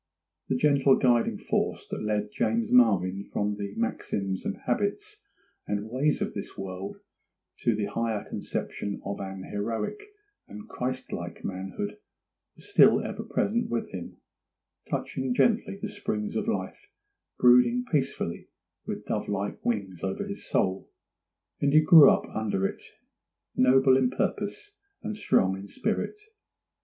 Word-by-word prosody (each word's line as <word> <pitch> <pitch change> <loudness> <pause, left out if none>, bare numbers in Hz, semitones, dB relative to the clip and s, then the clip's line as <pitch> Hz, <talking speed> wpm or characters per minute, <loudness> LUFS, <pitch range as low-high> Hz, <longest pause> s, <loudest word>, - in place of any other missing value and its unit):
The 130 - +2
gentle 140 0 +4
guiding 120 -3 +2
force - - -1
that - - -3
led 105 -1 -1
James 230 - 0
Marvyn 95 - +4
from 105 0 -2
the 100 -1 -5
maxims 100 -4 -2
and 95 - -2
habits 410 - -2 0.5
and 105 +2 -3
ways 145 +4 +1
of - - -4
this - - -7
world 95 0 -6 0.6
to 115 - +2
the 105 -1 -1
higher 110 0 -2
conception 100 -1 -4
of 100 0 -4
an 95 -1 -6
heroic 110 - -3 0.5
and 105 0 -10
Christ 130 +1 -4
like 85 0 -6
manhood 95 +2 -4 0.6
was - - -16
still - - +6
ever - - -4
present 230 +4 0
with 120 -1 -2
him, 90 -2 -7 0.7
gently 130 -1 -2
touching 215 - +2
the 210 - -3
springs 155 - -3
of - - -1
life, - - -3 0.5
brooding 125 - +5
peacefully 135 - -1 0.4
with - - -5
dove - - -2
like 100 0 -3
wings 100 -6 -2
over 95 0 -2
his - - -7
soul, 95 +1 0 0.7
and 140 0 +2
he 155 - +8
grew 155 -1 +9
up - - +2
under 105 -3 0
it - - -3 0.7
noble 130 +1 +5
in 130 -2 +3
purpose 205 - -3 0.3
and 215 - -3
strong 95 - +2
in 95 +1 -8
spirit. 215 - -2
115 Hz, 140 wpm, -27 LUFS, 100-150 Hz, 0.7 s, grew